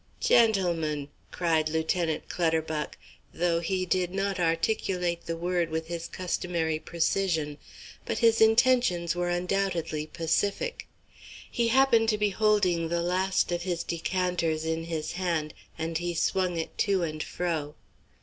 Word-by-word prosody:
"Gentlemen," 170 -10 +2 0.2
cried 160 -3 +1
Lieutenant 160 0 -1
Clutterbuck, 160 -3 -1 0.4
though 170 -1 +1
he 185 +2 -1
did 180 -1 +1
not 195 0 -1
articulate 175 0 0
the 165 0 -2
word 175 0 0
with 160 0 -3
his 170 -1 -4
customary 170 -3 -2
precision; 160 -3 -1 0.4
but - - -3
his 230 -2 +4
intentions 220 -7 +4
were 175 0 -1
undoubtedly 175 -4 -1
pacific. 200 - -1 0.6
He 235 -1 +1
happened 230 -2 +4
to 215 - +2
be 210 0 +2
holding 190 -5 +2
the 170 0 0
last 185 +1 +1
of 175 0 -1
his 175 -2 -2
decanters 170 -2 -1
in 160 0 -2
his 160 -2 -3
hand, 170 -4 -2 0.2
and 165 0 -2
he 175 0 -3
swung 180 +1 0
it 165 - -5
to 195 -3 +2
and 155 -2 -3
fro. 160 -5 -3
175 Hz, 135 wpm, -28 LUFS, 160-190 Hz, 0.6 s, his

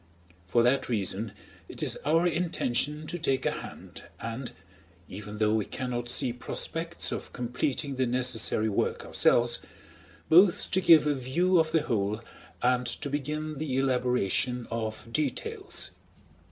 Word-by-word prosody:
For 120 +5 +3
that 130 +3 +2
reason 105 -1 0 0.4
it - - -5
is - - +1
our 165 +4 +3
intention 155 -4 0
to 175 +3 -4
take 135 -3 0
a - - +3
hand, - - -9
and, 115 +3 -5 0.6
even 105 +2 -8
though 105 0 +2
we 110 -2 +1
cannot 120 -1 -4
see 125 0 +1
prospects 165 +7 -2
of - - -5
completing 125 +3 -2
the 130 -1 +1
necessary 120 -3 +1
work 105 - -1
ourselves, 120 0 +3 0.7
both 175 +3 +5
to 190 - +2
give 160 -4 +7
a 150 - +3
view 165 +8 +2
of 160 -1 +2
the 160 -2 +2
whole 105 -4 0 0.4
and 125 0 +2
to 140 +4 -3
begin 150 +1 -3
the 140 -4 -2
elaboration 125 -2 +1
of 110 -1 -3
details. 150 -2 -1
125 Hz, 140 wpm, -28 LUFS, 120-150 Hz, 0.7 s, give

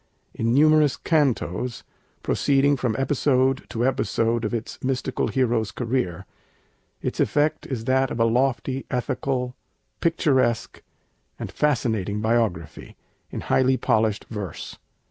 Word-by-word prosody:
In 115 +1 -1
numerous 150 +1 +4
cantos, 125 - 0 0.4
proceeding 140 +1 +2
from 125 -4 -1
episode 135 -1 +1
to 120 +1 -1
episode 115 -3 0
of 110 - -1
its 115 -2 -5
mystical 130 -1 -1
hero's 120 -5 0
career, 115 -8 -2 0.8
its - - -3
effect 150 +1 +1
is 120 -5 -4
that 130 +1 +2
of 115 - -4
a 115 - +4
loftily 130 +2 0
ethical, 125 0 -2 0.4
picturesque, 135 -8 +1 0.6
and - - -6
fascinating 110 -8 0
biography, 110 -8 -1 0.3
in - - -5
highly 130 0 +2
polished 110 -3 +1
verse. 105 -6 -6
125 Hz, 115 wpm, -24 LUFS, 115-135 Hz, 0.8 s, numerous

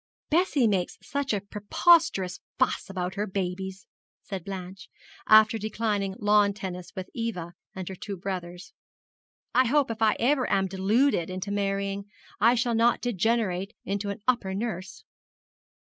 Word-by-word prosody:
'Bessie 315 -6 +3
makes 190 -4 0
such 280 -1 -2
a 205 - +1
preposterous 210 - +2 0.2
fuss 255 -5 0
about 180 -1 -3
her 205 +2 -2
babies,' 190 0 -4 0.4
said 190 -4 -6
Blanche, 190 0 -7 0.4
after 215 +1 +6
declining 210 -2 -1
lawn 205 -2 +4
tennis 180 -3 -6
with 185 -1 -5
Eva 195 -8 -4 0.2
and 185 -2 -5
her 190 - -4
two 195 +1 -6
brothers. 180 -1 -6 0.8
'I 255 -1 +4
hope 280 -1 +2
if 225 0 -6
ever 245 +5 +2
I - - +3
am 195 - +1
deluded 195 +2 +1
into 185 +2 -4
marrying, 200 0 -1 0.3
I 230 +3 +5
shall 240 0 +1
not 230 +1 +3
degenerate 220 -3 0
into 200 +1 -2
an 200 +1 -6
upper 220 -7 +1
nurse.' 195 -3 -4
200 Hz, 145 wpm, -27 LUFS, 190-230 Hz, 0.8 s, after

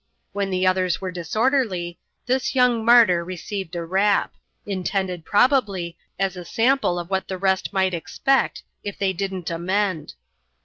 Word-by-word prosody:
When 200 -1 -1
the 185 0 0
others 185 -2 +2
were 185 -1 -4
disorderly, 185 -1 -1 0.3
this 260 +1 0
young 250 -3 +3
martyr 225 -7 +6
received 185 +1 -6
a 170 -1 -3
rap; 195 +4 +2 0.3
intended, 185 -3 -2
probably, 205 -8 +2 0.2
as 195 -1 -1
a 180 - -7
sample 230 0 +1
of 175 +2 -6
what 190 0 -1
the 190 - -4
rest 190 0 0
might 190 -2 +1
expect, 270 +10 0 0.2
if 205 -1 -5
they 195 -1 0
didn't 190 -2 -4
amend. 185 - -1
190 Hz, 145 wpm, -23 LUFS, 180-210 Hz, 0.3 s, martyr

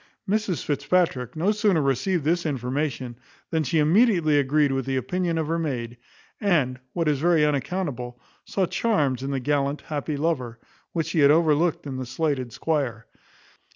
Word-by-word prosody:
Mrs 210 -3 0
Fitzpatrick 150 -3 0
no 175 +6 +2
sooner 210 -5 +2
received 145 +5 0
this 170 +3 +1
information, 130 -3 -3 0.3
than 160 -1 +1
she 155 +2 0
immediately 165 -2 +4
agreed 145 +1 +2
with 135 -1 -2
the 135 - 0
opinion 170 +6 -1
of 160 -2 -1
her 165 +1 0
maid; 120 -7 -3 0.4
and, 150 - +1
what 165 -2 -1
is 145 -3 +2
very 165 -1 +3
unaccountable, 140 -5 -2 0.2
saw 195 - 0
charms 150 - 0
in 135 - -3
the 135 -1 -1
gallant, 140 +1 0
happy 150 -1 -4
lover, 135 -7 -1 0.3
which 165 -2 -1
she 165 - 0
had 140 -1 +6
overlooked 160 +1 +3
in 135 -2 -5
the 130 -1 -5
slighted 130 -2 -1
squire. 130 -7 -2
150 Hz, 160 wpm, -25 LUFS, 130-170 Hz, 0.4 s, had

